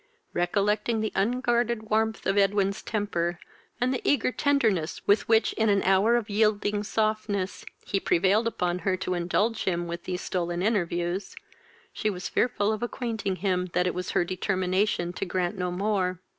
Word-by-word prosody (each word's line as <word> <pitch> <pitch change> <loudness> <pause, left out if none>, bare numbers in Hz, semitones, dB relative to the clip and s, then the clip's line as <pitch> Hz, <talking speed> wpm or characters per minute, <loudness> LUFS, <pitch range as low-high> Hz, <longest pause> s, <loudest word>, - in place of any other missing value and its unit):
Recollecting 210 +5 +1
the 220 - -1
unguarded 235 -1 0
warmth 220 0 +1
of 195 - +1
Edwin's 200 0 +2
temper, 175 -5 -2 0.4
and 255 +2 +1
the 255 - -2
eager 260 -3 +2
tenderness 225 - +1
with 205 +2 +3
which 225 0 +4
in 220 -1 +1
an 200 -1 +3
hour 195 +5 +4
of 235 -3 0
yielding 210 -1 +1
softness 215 -2 -1 0.2
he 195 - 0
prevailed 195 +6 +2
upon 180 -5 -1
her 185 0 0
to 185 - -2
indulge 195 +6 0
him 175 -2 0
with 170 0 -6
these 180 -1 -3
stolen 175 -1 -2
interviews, 180 -2 -1 0.6
she 215 - -1
was 180 -3 -4
fearful 220 -4 +1
of 215 - -4
acquainting 230 -5 -2
him 185 -1 0
that 180 - +2
it 180 - 0
was 180 0 -4
her 175 - +1
determination 185 0 0
to 185 - -4
grant 180 0 -1
no 180 -1 -2
more. 185 -1 -1
200 Hz, 165 wpm, -27 LUFS, 180-220 Hz, 0.6 s, which